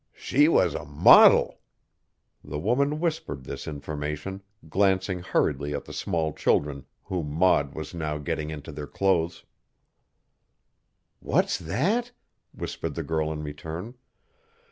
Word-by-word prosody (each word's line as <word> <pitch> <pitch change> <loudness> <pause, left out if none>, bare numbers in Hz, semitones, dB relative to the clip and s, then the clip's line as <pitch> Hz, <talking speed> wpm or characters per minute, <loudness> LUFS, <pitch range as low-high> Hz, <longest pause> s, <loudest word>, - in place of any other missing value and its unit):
She 145 +3 +3
was 165 - +3
a - - -4
modil!" 75 0 +6 0.9
The 75 0 -5
woman 140 - +1
whispered 155 - -3
this - - -7
information, 75 +5 -5 0.3
glancing 95 +1 +1
hurriedly 75 -4 0
at - - -5
the - - -10
small 80 -5 -1
children 70 -2 0 0.2
whom 85 -5 -3
Maud 75 -3 +2
was 80 +1 -6
now 75 -3 -3
getting 75 +1 -3
into 75 -3 -7
their 75 0 -7
clothes. 85 -2 0 1.7
"What's - - +1
that?" 210 - -1 0.4
whispered - - -5
the - - -3
girl 80 -1 -1
in 75 -1 -5
return. 80 +8 -6
80 Hz, 120 wpm, -26 LUFS, 75-95 Hz, 1.7 s, modil